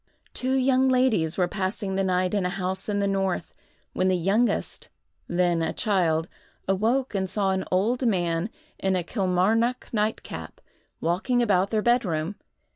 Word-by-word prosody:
Two 260 +1 -1
young 260 0 +3
ladies 240 -11 +2
were 180 -2 +2
passing 195 0 -3
the 195 0 +1
night 185 0 +1
in 200 -2 +1
a 180 - 0
house 190 +1 -3
in 205 - 0
the 200 0 +1
north, 195 -3 -1 0.4
when 185 - +1
the 185 -1 +2
youngest, 200 +7 0 0.4
then 175 -1 +1
a 160 0 -1
child, 170 -6 +1 0.4
awoke 225 +8 +1
and 190 -2 -1
saw 195 -1 +1
an 190 0 -1
old 235 +7 +1
man, 175 -2 0 0.3
in 190 -1 +1
a 180 - 0
Kilmarnock 210 +6 +1
nightcap, 215 0 -3 0.4
walking 215 +9 +1
about 195 -3 +2
their 215 -1 0
bed 240 +1 +3
room. 165 +1 -2
195 Hz, 160 wpm, -25 LUFS, 180-225 Hz, 0.4 s, young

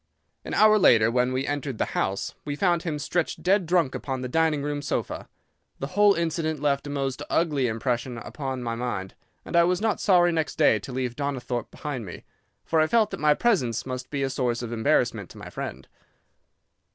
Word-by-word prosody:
An - - -4
hour 215 0 +6
later, 115 - +5
when 125 +1 +2
we 130 +1 -1
entered 145 -4 -3
the - - +1
house, 95 0 -1
we 145 -1 -3
found 175 0 +2
him 160 -4 -3
stretched 170 +3 -2
dead 190 -1 +3
drunk 170 -6 +2
upon 130 -2 -4
the 125 - -3
dining 155 +1 +1
room 145 0 -2
sofa. 145 - -3 0.5
The 135 - -5
whole 205 0 +5
incident 160 -2 -1
left 145 0 0
a - - -5
most 135 -1 -2
ugly 150 -6 +1
impression 120 +2 -2
upon 130 +1 -5
my 115 -1 -2
mind, 115 -5 -4 0.3
and - - -5
I 170 - +7
was 180 +1 +2
not 220 0 0
sorry 175 -3 +4
next 160 -3 -1
day 110 - +4
to 115 - -9
leave 125 -1 -2
Donnithorpe 130 -4 -3
behind 145 -6 -5
me, 90 - -9 0.4
for 160 -1 +2
I 155 - +3
felt 220 +2 +3
that - - -5
my 150 0 +4
presence 125 - +1
must 130 -1 -5
be 140 -2 -2
a 135 - -1
source 125 -2 -1
of 120 - -5
embarrassment 115 - +1
to - - -13
my - - -9
friend. - - -6
140 Hz, 200 wpm, -26 LUFS, 125-165 Hz, 0.5 s, I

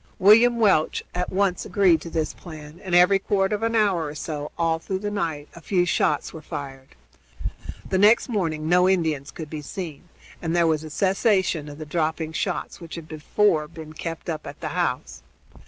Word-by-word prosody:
William 230 +5 +6
Welch 195 -9 +3
at 180 0 -2
once 190 -1 +1
agreed 180 -6 +3
to 170 - -7
this 160 -2 -1
plan, 155 0 -11
and 180 -3 0
every 180 +3 +6
quarter 195 +1 +1
of 205 - -6
an 230 0 0
hour 195 -7 +2
or 145 - -7
so 150 -1 -5
all 165 -1 +1
through 190 +3 -3
the 205 +2 -4
night 160 -7 -2
a 170 - -11
few 180 0 +1
shots 150 -3 +1
were 160 - -8
fired. 135 - -8 0.9
The 190 - 0
next 210 +4 +5
morning 165 -9 -1
no 180 +2 +4
Indians 160 -7 0
could 160 - -7
be 155 -1 -4
seen, 170 +1 -7 0.3
and 165 0 -1
there 170 -1 +4
was 160 -1 +1
a 155 - -7
cessation 190 -3 +1
of 145 - -9
the 155 - -7
dropping 160 0 -1
shots 180 +2 -3
which 165 -1 -8
had 165 -2 -8
before 155 +1 +1
been 155 -1 -10
kept 165 +1 -6
up 160 -3 -4
at - - -9
the - - -4
house. - - -2
170 Hz, 195 wpm, -24 LUFS, 155-190 Hz, 0.9 s, William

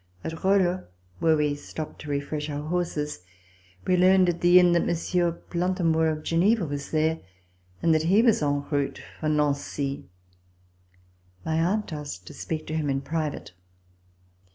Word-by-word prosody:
At 160 0 -6
Rolle, 185 -2 +2 0.3
where 160 -1 +3
we 150 -1 +1
stopped 150 +2 -7
to 150 - -8
refresh 145 +1 -3
our 145 +1 -4
horses, 160 - -2 0.7
we 185 - +3
learned 185 0 +5
at 170 -1 -2
the 175 +1 +7
inn 180 -1 +5
that 170 0 +3
Monsieur 175 +1 +1
Plantamour 170 -1 0
of 155 -1 -3
Geneva 185 +4 +2
was 140 -1 -5
there 160 +1 +1 0.6
and 165 - +4
that 155 - +3
he 205 +5 +5
was 225 -6 +4
en 145 -1 0
route 140 -2 -1 0.2
for 155 - -1
Nancy. 145 -4 -1 1.4
My 160 0 0
aunt 190 +1 0
asked 145 - -7
to - - -10
speak 155 -1 -5
to - - -6
him 155 -2 -1
in 135 0 0
private. 150 - -4
160 Hz, 155 wpm, -26 LUFS, 150-175 Hz, 1.4 s, the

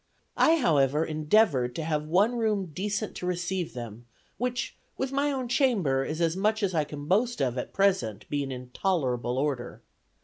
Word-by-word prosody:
I, 325 - +5
however, 150 - +2
endeavored 155 - +2
to 160 - -3
have 155 -1 -1
one 200 +9 +3
room 210 -6 0
decent 205 +4 -2
to 180 - -4
receive 180 -2 -2
them, 120 -1 -8 0.3
which, 245 +1 -2 0.2
with 265 0 -2
my 280 +1 +1
own 260 -3 -2
chamber, 210 - +2
is 155 +4 -4
as 165 0 +2
much 215 +3 +1
as 190 -2 +1
I 155 -3 +1
can 145 -1 -7
boast 225 +9 +1
of 130 -3 0
at 125 - -4
present 190 - +1
being 140 -2 -2
in 125 -1 -7
tolerable 130 -10 0
order. 135 -3 -2
170 Hz, 175 wpm, -28 LUFS, 135-210 Hz, 0.3 s, I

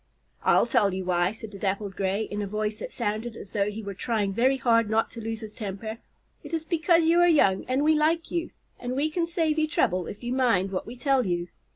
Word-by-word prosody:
"I'll - - +4
tell 220 -6 +2
you 190 -1 -4
why," 175 0 +2
said 220 -1 -9
the 200 - -10
Dappled 200 0 -2
Gray, 195 +2 0
in 205 -1 -4
a 205 - -3
voice 210 +1 -2
that - - -6
sounded 215 +3 -3
as 195 - -10
though 205 -1 +1
he 215 +1 -6
were 200 -1 -5
trying 205 -1 -1
very 255 +5 +3
hard 230 -3 +3
not 220 +1 +1
to 230 - -8
lose 225 0 -4
his 215 -1 -7
temper. 220 +2 -6 0.4
"It - - -4
is 320 -1 -4
because 335 0 +3
you 335 +2 +4
are 350 - +6
young 200 - +3
and 260 +3 0
we 310 +1 +5
like 315 +2 +1
you, 340 -1 -1 0.3
and 245 +1 -4
we 300 +3 0
can 335 +1 0
save 325 -2 0
you 310 - +2
trouble 185 - +1
if 205 - -8
you 240 +1 -2
mind 230 -8 +2
what 185 - -3
we 235 - -7
tell 260 -2 +1
you. 175 -1 -1
225 Hz, 245 wpm, -26 LUFS, 200-285 Hz, 0.4 s, are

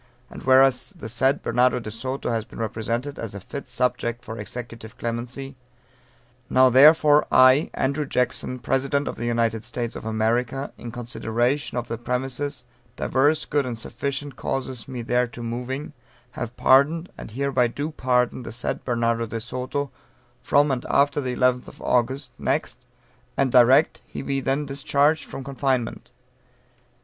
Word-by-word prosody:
And - - -9
whereas 130 +4 +4
the 150 - -7
said 130 +5 +1
Bernardo 125 +2 +2
de 110 -2 -7
Soto 130 +3 -3
has 115 -1 0
been - - -14
represented 115 +5 -3
as 110 -3 -5
a - - -5
fit 140 +8 -8
subject 120 0 -1
for 110 0 -7
executive 115 +1 -8
clemency 125 +4 -4 0.9
Now 130 0 +5
therefore, 150 +3 +6
I, 130 +3 +6
Andrew 140 +2 0
Jackson, 125 0 -1
President 135 +4 0
of - - -2
the 120 - -4
United 115 -2 0
States 120 -1 -4
of - - -7
America, 115 +5 -1
in 120 - -8
consideration 120 +3 -1
of 120 - -2
the 115 -1 -4
premises, 130 +2 -2 0.3
divers 145 +4 +2
good 145 -1 +1
and 125 -3 -4
sufficient 140 +3 -4
causes 130 -4 -4
me 125 -3 -5
thereto 120 0 -1
moving, 125 +4 -4 0.4
have 120 +1 -6
pardoned, 155 +6 +4
and - - -9
hereby 130 +1 +1
do 145 +6 -4
pardon 125 -3 +1
the 120 - -7
said 120 +1 -3
Bernardo 115 -1 0
de 115 +1 -4
Soto, 130 +4 -4 0.5
from 145 +3 +3
and 125 -2 -1
after 145 +1 +3
the 125 -2 -3
11th 125 0 0
August 125 +2 0
next, 130 -2 -2 0.5
and 135 -2 +2
direct 130 +5 +6
that - - -20
he - - -6
be 135 0 -1
then 135 +2 -1
discharged 140 +2 +1
from 135 - -7
confinement. 130 -3 -2
125 Hz, 155 wpm, -24 LUFS, 120-140 Hz, 0.9 s, therefore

